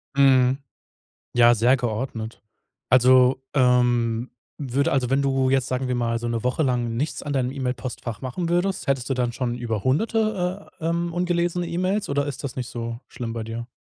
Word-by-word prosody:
Mhm. 135 -1 +4 0.7
Ja, 120 0 +6
sehr 120 +4 +4
geordnet. 115 -2 -4 0.5
Also, 130 +1 +5
ähm, 120 -2 +2 0.3
würde 140 0 0
also, 130 -2 +1
wenn 135 +1 +2
du 135 -1 +1
jetzt, 135 -1 +2
sagen 130 0 -2
wir 125 - 0
mal, 115 -1 0
so 120 - -4
'ne 115 -1 -2
Woche 125 +5 +1
lang 120 -3 0
nichts 145 +6 -2
an 145 -1 -3
deinem 130 -2 0
E-Mail-Postfach 125 -3 -4
machen 150 +7 -3
würdest, 175 +1 0
hättest 135 -1 0
du - - +2
dann 125 -2 -1
schon 120 -2 -2
über 115 -4 -3
hunderte 200 - 0
äh, 160 - -5
ähm, 170 +1 0
ungelesene 175 0 0
E-Mails 185 +4 -1
oder 140 0 0
ist 145 - -6
das 130 - -5
nicht 130 -1 -4
so 115 0 -5
schlimm 120 -2 -6
bei 115 -1 -4
dir? 115 +1 -6
130 Hz, 185 wpm, -24 LUFS, 120-145 Hz, 0.7 s, Ja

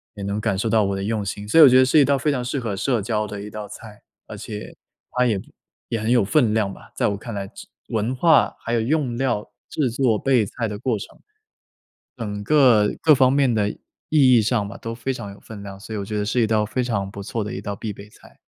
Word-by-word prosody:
也 100 - -7
能 100 +2 -2
感 100 - 0
受 110 +3 -1
到 110 -1 +3
我 100 0 -1
的 95 - -4
用 105 -1 -2
心。 100 +2 -5
所 165 - +4
以 - - +11
我 - - +10
觉 130 +1 +6
得 130 - +6
是 150 +4 +4
一 140 - +6
道 140 -1 +2
非 150 +2 +1
常 125 -3 -2
适 135 +2 -2
合 110 -5 -3
社 120 +1 0
交 105 0 -1
的 100 -1 -7
一 105 - -7
道 105 -1 -7
菜， 105 -1 -12 0.2
而 - - -8
且 105 -1 -8 0.4
它 125 0 +1
也 105 -5 +1 0.5
也 115 - -1
很 110 +2 -1
有 120 -4 +4
分 115 -1 +2
量 105 -3 +1
吧 - - -15
在 - - +1
我 100 -1 -1
看 115 +2 -8
来。 100 -1 -5 0.4
文 110 +3 -1
化 160 +5 +4
还 120 - -4
有 115 - +2
用 130 -2 0
料， 120 -5 -1 0.2
制 135 -5 0
作、 115 -3 +1
备 125 -6 +2
菜 115 +3 -4
的 105 -1 -5
过 115 -2 -1
程 - - -11 1.0
整 105 -3 -5
个 125 -7 +4
各 155 -3 +6
方 130 0 +4
面 135 -3 +2
的 105 -2 +1
意 - - -14 0.3
义 130 -6 +6
上 105 -2 0
吧， - - -9
都 115 0 -6
非 130 +3 -3
常 100 -5 -7
有 100 - -13
分 105 -3 -10
量。 100 -1 -9
所 110 +1 -7
以 - - -3
我 - - -3
觉 105 0 -4
得 105 - -1
是 120 +4 +1
一 110 - +2
道 110 -1 +2
非 125 +4 -2
常 100 -5 -2
不 100 -1 -8
错 110 +1 -3
的 105 - -5
一 - - -5
道 100 -1 -4
必 105 -2 -5
备 100 +1 -12
菜。 - - -20
110 Hz, 285 characters per minute, -22 LUFS, 105-125 Hz, 1.0 s, 以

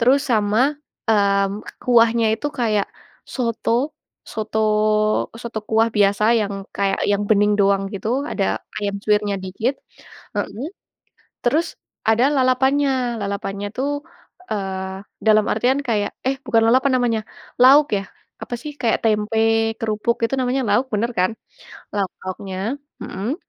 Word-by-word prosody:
terus 265 +4 +4
sama, 240 +5 +2 0.2
mmm, 200 -2 +2 0.2
kuahnya 230 -2 +4
itu 290 - -2
kayak 220 -7 0 0.4
soto, 240 +3 -1 0.3
soto 215 0 +1
soto 230 -2 -5
kuah 225 0 +2
biasa 210 +2 +3
yang 200 -1 -3
kayak 195 -1 0
yang 205 0 0
bening 210 -1 +4
doang 195 0 +2
gitu, 240 +8 -1
ada 200 -9 -1 0.2
ayam 200 -1 -2
suwirnya 210 -1 +2
dikit. 195 +8 -2 0.6
Mhm. 215 +8 -3 0.8
Terus 305 +7 +1 0.3
ada 230 +4 +4
lalapannya. 265 -1 +2
Lalapannya 200 0 -3
tuh, 285 +2 -1 0.5
eee, 190 -2 -3 0.3
dalam 215 -1 +5
artian 250 +5 +2
kayak 210 -3 0 0.2
eh 270 - +1
bukan 230 -2 +3
lalapan 260 +3 +4
namanya, 230 -3 +1 0.4
lauk 275 -2 +7
ya? 195 - -3 0.4
Apa 240 - -4
sih? 300 -1 -6
Kayak 230 -2 +2
tempe 225 +1 +2
kerupuk 225 +1 -1
itu 270 - -2
namanya 255 +1 0
lauk, 225 +6 +3
bener 230 +4 0
kan? 185 +4 +3 0.6
Lauk-lauknya, 190 +3 -3 0.3
mhm, 215 +10 -3
220 Hz, 125 wpm, -21 LUFS, 205-250 Hz, 0.8 s, lauk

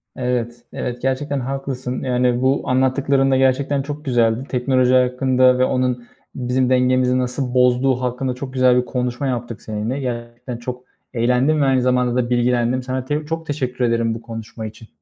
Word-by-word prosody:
Evet, 120 -2 -2
evet. 120 0 -4
Gerçekten 135 +2 -1
haklısın. 130 -1 -4
Yani, 125 -1 +1
bu 130 +2 +2
anlattıkların 135 +1 +2
da 130 - +4
gerçekten 135 +2 +2
çok 145 +2 -7
güzeldi. 120 -2 +2
Teknoloji 130 0 +2
hakkında 130 0 +3
ve 130 - +4
onun 125 -2 -1 0.3
bizim 125 0 0
dengemizi 125 0 +3
nasıl 125 0 -2
bozduğu 125 +1 +3
hakkında 125 +1 -2
çok 130 +1 -7
güzel 130 -1 +4
bir - - -9
konuşma 125 +2 -2
yaptık 120 -3 -4
seninle. 110 +5 -3
Gerçekten 120 -1 -5
çok 125 +1 -6 0.3
eğlendim 125 +5 +2
ve - - +3
aynı 135 -1 +3
zamanda 125 -1 +1
da 125 -1 0
bilgilendim. 125 +1 +1
Sana 130 0 -3
te 150 +3 -2
çok 165 +1 -4
teşekkür 130 -4 -2
ederim 115 -1 +1
bu 115 - -8
konuşma 115 -1 -7
için. 110 +1 -10
125 Hz, 170 wpm, -20 LUFS, 120-130 Hz, 0.3 s, da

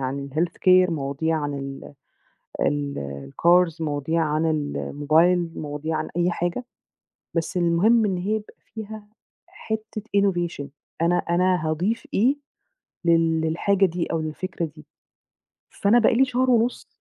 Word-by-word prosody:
عن 140 +2 -3
الhealthcare 180 +3 +3
مواضيع 155 +1 -1
عن 145 -1 -3 1.1
ال 70 - -2
الcars 175 -1 +3
مواضيع 155 +1 -1
عن 155 +1 0
الموبايل، 155 +3 +1
مواضيع 150 +1 -3
عن - - -3
أي 175 +1 +2
حاجة، 175 +7 -2 0.7
بس 165 +3 -2
المهم 180 +7 +3
إن 195 -3 0
هي 200 +5 -1
يبقى 215 -1 -5 0.2
فيها 215 -1 -7 0.4
حِتّة 220 -1 -6
innovation 175 -7 0 0.4
أنا 175 +1 +3
أنا 175 -1 +1
هاضيف 180 +9 -1
إيه 255 +8 +3 0.7
لل 165 -1 +3
للحاجة 190 +5 +2
دي 175 -1 -2
أو 165 - -2
للفكرة 170 +2 -4
دي؟ 155 -1 -12 0.8
فأنا 215 +4 +3
بقى 235 - +4
لي 265 +3 +4
شهر 255 0 0
ونُص 240 +1 +1
170 Hz, 125 wpm, -24 LUFS, 155-195 Hz, 1.1 s, بقى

